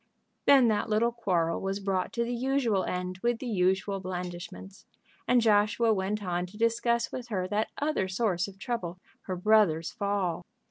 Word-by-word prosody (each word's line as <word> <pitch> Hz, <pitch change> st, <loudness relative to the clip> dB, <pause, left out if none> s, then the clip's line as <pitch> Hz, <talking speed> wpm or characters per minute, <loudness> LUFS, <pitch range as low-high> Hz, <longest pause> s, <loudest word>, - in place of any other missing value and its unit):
Then 270 Hz, -4 st, +7 dB
that 215 Hz, 0 st, 0 dB
little 225 Hz, +2 st, +2 dB
quarrel 180 Hz, -8 st, 0 dB
was 195 Hz, +1 st, -2 dB
brought 195 Hz, -2 st, -1 dB
to 235 Hz, -, 0 dB
the 240 Hz, +1 st, -3 dB
usual 245 Hz, -5 st, +1 dB
end 180 Hz, 0 st, -3 dB
with 235 Hz, +2 st, +1 dB
the 255 Hz, -, -7 dB
usual 195 Hz, -2 st, +1 dB
blandishments, 180 Hz, +1 st, -7 dB, 0.4 s
and 245 Hz, -1 st, +4 dB
Joshua 215 Hz, +1 st, +3 dB
went 205 Hz, +1 st, -2 dB
on 180 Hz, -1 st, -2 dB
to 200 Hz, +4 st, -14 dB
discuss 235 Hz, +1 st, +1 dB
with 250 Hz, -2 st, -6 dB
her 190 Hz, -5 st, -2 dB
that 210 Hz, +2 st, 0 dB
other 290 Hz, -10 st, 0 dB
source 190 Hz, -2 st, 0 dB
of 195 Hz, -1 st, -12 dB
trouble, 190 Hz, -6 st, -4 dB, 0.3 s
her 185 Hz, -, -2 dB
brother's 180 Hz, -4 st, +3 dB
fall. 200 Hz, -4 st, -1 dB
205 Hz, 170 wpm, -29 LUFS, 185-230 Hz, 0.4 s, Then